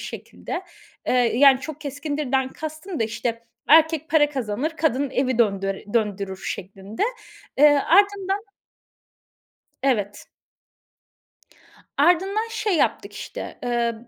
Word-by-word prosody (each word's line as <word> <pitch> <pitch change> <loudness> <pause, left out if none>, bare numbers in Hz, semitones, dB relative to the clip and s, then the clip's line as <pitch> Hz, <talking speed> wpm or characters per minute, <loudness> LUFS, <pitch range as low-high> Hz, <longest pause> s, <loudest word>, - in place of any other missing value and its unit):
şekilde. 370 - -6 0.4
Eee, - - +1
yani 255 +2 +5
çok 310 +2 -7
keskindirden 285 -2 -2
kastım 315 +3 -7
da 225 - +3
işte, 230 +1 -4 0.2
erkek 320 0 +5
para 295 -2 +4
kazanır, 260 +3 -2
kadın 285 -4 0
evi 260 -2 0
döndör 195 -3 +1 0.2
döndürür 200 -4 -1
şeklinde. 195 - -5 0.6
Eee, 295 0 +7 0.2
ardından 400 +1 +3 1.4
Evet. 205 -7 -1 1.7
Ardından 380 +8 +2
şey 425 -3 -1
yaptık - - 0
işte, - - -8
ııı, 235 -1 -1
275 Hz, 100 wpm, -23 LUFS, 230-320 Hz, 1.7 s, Eee